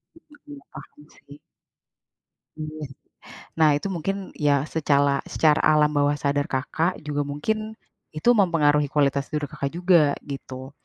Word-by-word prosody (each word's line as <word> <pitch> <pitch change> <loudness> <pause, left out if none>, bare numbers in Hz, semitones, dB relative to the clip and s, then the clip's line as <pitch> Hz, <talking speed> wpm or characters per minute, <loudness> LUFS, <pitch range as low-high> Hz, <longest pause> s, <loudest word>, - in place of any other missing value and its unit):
Mmm, 295 -2 -16
mhm, - - -12
paham 150 +1 -14
sih. 145 +1 -16 1.2
Iya. 155 0 -7 0.8
Nah 160 -1 +5
itu 145 - -3
mungkin, 190 +2 -2 0.2
ya 145 -1 +2 0.2
secala 140 -3 +1
secara 155 -1 +2
alam 150 -1 +4
bawah 145 0 +2
sadar 145 0 0
Kakak 160 +7 -1
juga 145 -1 -1
mungkin, 215 +10 -3 0.4
itu 155 +9 -2
mempengaruhi 150 -5 +3
kualitas 140 -1 +1
tidur 150 -1 -3
Kakak 140 - -4
juga, 175 -5 +4 0.2
gitu. 130 -1 -7
150 Hz, 135 wpm, -24 LUFS, 145-165 Hz, 1.2 s, Nah